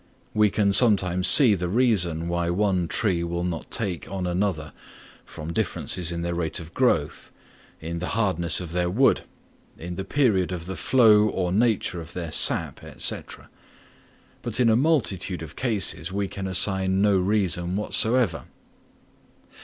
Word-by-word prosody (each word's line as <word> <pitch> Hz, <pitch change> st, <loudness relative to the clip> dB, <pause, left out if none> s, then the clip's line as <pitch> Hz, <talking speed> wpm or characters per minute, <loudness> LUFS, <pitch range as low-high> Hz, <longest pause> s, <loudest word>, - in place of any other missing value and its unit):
We 105 Hz, -1 st, +3 dB
can 100 Hz, 0 st, 0 dB
sometimes 95 Hz, -6 st, +3 dB
see 130 Hz, -8 st, +8 dB
the 90 Hz, -2 st, -3 dB
reason 90 Hz, -8 st, +1 dB
why 85 Hz, 0 st, -2 dB
one 95 Hz, -1 st, 0 dB
tree 90 Hz, -2 st, -1 dB
will 85 Hz, +1 st, -4 dB
not 90 Hz, -2 st, -5 dB
take 100 Hz, -7 st, -4 dB
on 95 Hz, -2 st, -4 dB
another 90 Hz, -4 st, -3 dB, 0.5 s
from 80 Hz, +2 st, -8 dB
differences 85 Hz, +1 st, -1 dB
in 85 Hz, 0 st, -4 dB
their 85 Hz, 0 st, -3 dB
rate 85 Hz, 0 st, -2 dB
of 80 Hz, -1 st, -12 dB
growth, 85 Hz, -, -1 dB, 0.5 s
in 85 Hz, +1 st, -6 dB
the 90 Hz, -, -4 dB
hardness 90 Hz, -6 st, +1 dB
of 90 Hz, -3 st, -8 dB
their 90 Hz, 0 st, -1 dB
wood, 125 Hz, +9 st, +2 dB, 0.6 s
in 90 Hz, +2 st, -7 dB
the 95 Hz, -, -5 dB
period 100 Hz, -6 st, 0 dB
of 85 Hz, -2 st, -6 dB
the 95 Hz, +1 st, -6 dB
flow 110 Hz, +2 st, +4 dB
or 90 Hz, -3 st, -3 dB
nature 105 Hz, -4 st, 0 dB
of 80 Hz, -, -12 dB
their 85 Hz, -3 st, -6 dB
sap, -, -, +2 dB, 0.2 s
&c. -, -, +1 dB, 1.2 s
but 120 Hz, -1 st, -3 dB
in 120 Hz, -2 st, +3 dB
a 110 Hz, -, +3 dB
multitude 95 Hz, -, 0 dB
of 80 Hz, 0 st, -11 dB
cases 100 Hz, -9 st, -1 dB
we 100 Hz, 0 st, -2 dB
can 95 Hz, 0 st, -7 dB
assign 95 Hz, +1 st, +1 dB
no 105 Hz, -1 st, +3 dB
reason 90 Hz, -2 st, 0 dB
whatever. 110 Hz, -2 st, +1 dB
95 Hz, 155 wpm, -24 LUFS, 85-105 Hz, 1.2 s, see